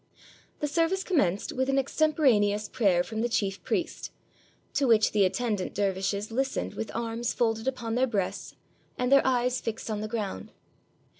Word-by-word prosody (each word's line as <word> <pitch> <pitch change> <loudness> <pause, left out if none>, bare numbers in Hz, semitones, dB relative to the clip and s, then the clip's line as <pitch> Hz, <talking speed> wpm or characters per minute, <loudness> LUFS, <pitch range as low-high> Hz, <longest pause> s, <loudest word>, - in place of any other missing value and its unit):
The 295 - +1
service 335 +5 +1
commenced 205 - +1
with 260 +1 -1
an 270 - +2
extemporaneous 255 -8 +2
prayer 195 -8 +2
from 220 +3 -4
the 240 - 0
chief 200 -3 -1
priest, - - -2 0.6
to 275 -1 +1
which 220 -2 +4
the 205 -2 +4
attendant 210 0 -1
der 200 -1 +1
vishes 200 +3 -2
listened 265 +3 -1
with 225 - -5
arms 230 0 -2
folded 225 -1 0
upon 235 -4 -2
their 255 +2 +2
breasts 200 -6 -3 0.4
and 250 +1 0
their 275 - +7
eyes 250 -1 +1
fixed 225 0 -4
on 210 -1 -2
the 215 - -3
ground. 210 - -4
230 Hz, 165 wpm, -28 LUFS, 205-260 Hz, 0.6 s, their